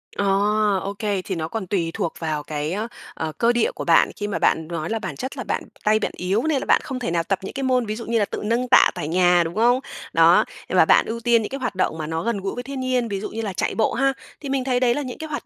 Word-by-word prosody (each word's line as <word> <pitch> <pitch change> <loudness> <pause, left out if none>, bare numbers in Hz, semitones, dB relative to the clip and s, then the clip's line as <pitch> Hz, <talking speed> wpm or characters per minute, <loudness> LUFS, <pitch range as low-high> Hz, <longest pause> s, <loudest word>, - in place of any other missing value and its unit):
Ờ, 200 - 0 0.6
OK, 200 +1 -5 0.3
thì 190 - -3
nó 160 -1 -3
còn 190 +1 -5
tùy 170 -4 -1
thuộc 180 -7 -2
vào 155 -3 -2
cái, 150 0 -3
a, 215 +4 -2 0.3
ờ, 160 -1 -4
cơ 235 0 +3
địa 240 - +1
của - - -4
bạn - - +5
khi 205 - -4
mà 205 - -2
bạn 160 -1 +2
nói 165 -2 -4
là 225 0 -1
bản - - -5
chất 260 +1 -6
là - - -3
bạn - - -2 0.2
tay 215 +1 +3
bạn - - -2
yếu 190 +6 0
nên 315 -3 +1
là - - -5
bạn - - +4
không 260 -1 -5
thể 225 - -2
nào 170 -1 +1
tập 195 +2 -1
những - - -6
cái 275 - -4
môn 255 -2 +2
ví 215 0 -3
dụ 230 - -7
như 230 0 +1
là 205 - +2
tự - - -6
nâng 235 +3 0
tạ 250 - +6
tại 145 - -4
nhà, 175 +1 +4
đúng 165 +3 -5
không? 240 +3 +4 0.3
Đó, - - +6 0.2
và - - +5
bạn - - +5
ưu 230 +1 -4
tiên 235 0 +3
những 210 - -4
cái 275 - -5
hoạt 250 -6 -3
động 185 -3 0
mà 155 -1 -4
nó 160 +1 -2
gần 230 -1 -1
gũi 195 - -3
với 245 - -5
thiên 275 +1 -6
nhiên, 255 -2 0
ví 200 -3 -3
dụ 205 - -5
như 225 - -4
là 205 -4 -3
chạy - - -1
bộ 220 - +1
ha, 270 +2 +2 0.3
thì 280 - -7
mình 270 -1 0
thấy 250 -1 +1
đấy 245 -1 +3
là 290 - -2
những 255 -3 -6
cái 315 - -7
hoạt 290 - -4
220 Hz, 305 wpm, -22 LUFS, 180-250 Hz, 0.6 s, tạ